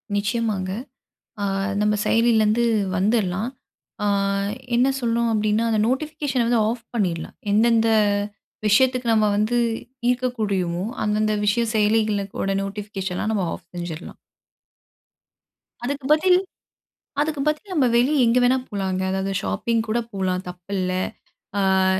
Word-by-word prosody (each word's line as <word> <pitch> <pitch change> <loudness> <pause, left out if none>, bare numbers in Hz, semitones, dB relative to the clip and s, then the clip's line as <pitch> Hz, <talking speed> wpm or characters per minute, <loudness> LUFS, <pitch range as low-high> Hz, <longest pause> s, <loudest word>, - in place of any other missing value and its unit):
நிச்சயமாங்க. 205 -2 -1 0.7
ஆ - - +1 0.4
நம்ம 210 0 +2
செயலில 230 -1 +4
இருந்து 215 +3 +2 0.3
வந்துர்லாம். 200 +2 +1 0.5
ஆ - - +1 0.7
என்ன 245 +3 +4
சொல்லணும் 235 -1 +1
அப்பிடின்னா, 215 +1 +1
அந்த 220 -1 +2
நோட்டிஃபிகேஷன 275 -1 -1
வந்து 235 -1 +3
ஆஃப் 235 0 -5
பண்ணிர்லாம். 180 -7 -2 0.2
எந்தெந்த 225 +1 +4 0.8
விஷயத்துக்கு 250 +4 +3
நம்ம 215 -1 +3
வந்து 215 +4 +1 0.5
ஈர்க்க 250 0 0
கூடியுமோ, 185 -4 -1 0.2
அந்தந்த 215 0 +1
விஷய 235 +3 +2
செயலிகளோட 210 -2 +1
நோட்டிஃபிகேஷன 195 -2 -4
நம்ம 200 -4 0
ஆஃப் - - -12
செஞ்சுர்லாம். 175 -1 -6 1.7
அதுக்கு 275 +2 -3
பதில் 360 +4 +4 0.8
அதுக்கு 300 -1 -1
பதில் 305 +6 -1
நம்ப 285 -7 +3
வெளிய 260 +3 +4
எங்க 235 +2 +4
வேணாலும் 255 +1 +2
போலாங்க. 190 -2 -2
அதாவது 190 +1 -1
ஷாப்பிங் 230 -1 0
கூட 220 +2 +1
போலாம் 185 -2 -1
தப்பில்ல. 185 +1 -3 0.9
அ - - +3
215 Hz, 115 wpm, -23 LUFS, 195-240 Hz, 1.7 s, செயலில